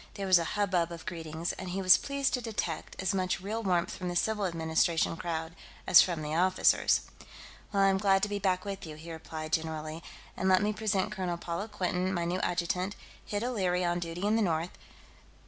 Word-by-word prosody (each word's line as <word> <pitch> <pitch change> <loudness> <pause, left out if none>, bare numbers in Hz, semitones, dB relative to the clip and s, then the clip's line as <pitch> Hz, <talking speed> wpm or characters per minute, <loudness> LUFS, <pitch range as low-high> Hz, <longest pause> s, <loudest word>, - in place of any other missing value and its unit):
There 200 - -4
was 185 -2 +6
a - - 0
hubbub 180 -5 +1
of 170 -1 -8
greetings, 165 -1 -4
and 185 - -7
he 185 +2 -3
was 185 0 +9
pleased 280 -1 -1
to 250 - 0
detect 210 -8 -4
as 190 +1 0
much 185 0 0
real 210 +5 -3
warmth 180 -4 +1
from 180 -1 -4
the 175 - -4
civil 210 +1 +1
administration 165 0 +1
crowd 165 -1 -4 0.3
as - - +9
from 170 -4 -1
the 150 +1 -3
officers. 185 +3 +3 0.7
"Well, 200 -1 +3
I'm 195 -1 +4
glad 195 -1 +3
to - - +3
be 205 0 -3
back 185 -1 0
with 195 -1 -5
you," 155 - -8
he 160 +2 -9
replied, 160 -1 -7
generally. 160 0 -2 0.3
"And 190 - 0
let 185 +1 +5
me 210 +1 +1
present 210 -3 0
Colonel 180 -2 -2
Paula 170 +4 -4
Quinton, 185 -2 -1
my 175 -2 -1
new 180 +2 -1
adjutant; 180 +3 -1 0.3
Hid 205 +1 -3
O'Leary's 185 -7 0
on 175 0 0
duty 175 +2 -4
in 210 +1 +3
the - - +2
north.... 170 -3 -1
180 Hz, 205 wpm, -30 LUFS, 170-195 Hz, 0.7 s, was